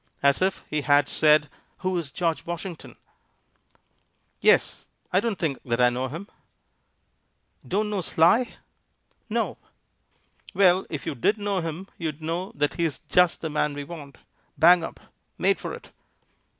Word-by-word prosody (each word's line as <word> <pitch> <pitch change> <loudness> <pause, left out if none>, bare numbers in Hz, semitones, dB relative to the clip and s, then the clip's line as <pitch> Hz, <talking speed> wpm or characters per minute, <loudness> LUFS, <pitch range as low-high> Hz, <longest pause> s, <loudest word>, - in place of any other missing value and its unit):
_" - - -46 0.2
as 140 +2 +4
if 190 +1 0
he 150 0 -1
had 145 0 +4
said, 150 -1 +4 0.4
Who 185 0 +1
is 170 -5 -2
George 165 +2 -1
Washington? 170 0 -7 1.4
"Yes; - - +3 0.3
I 185 - +5
don't 220 -2 -1
think 150 -6 -2
that 120 -1 -1
I 125 0 +5
know 125 +2 -2
him." 165 +9 -7 1.4
"Don't 210 +3 0
know 200 -2 -1
Sly?" 175 +9 +3 0.7
"No." - - -1 1.0
"Well, 185 -1 +4
if 155 - -5
you - - -2
did 140 - +1
know 205 -2 -1
him, 165 +3 -5
you'd 155 -3 -3
know 165 +4 -3
that 145 0 0
he's 165 -4 -1
just 180 -1 +2
the 160 - -3
man 150 -1 0
we 145 - -4
want; 145 -2 -10 0.4
bang 170 +3 +6
up; - - -7 0.4
made - - +2
for - - -5
it." - - -10
165 Hz, 150 wpm, -25 LUFS, 145-185 Hz, 1.4 s, bang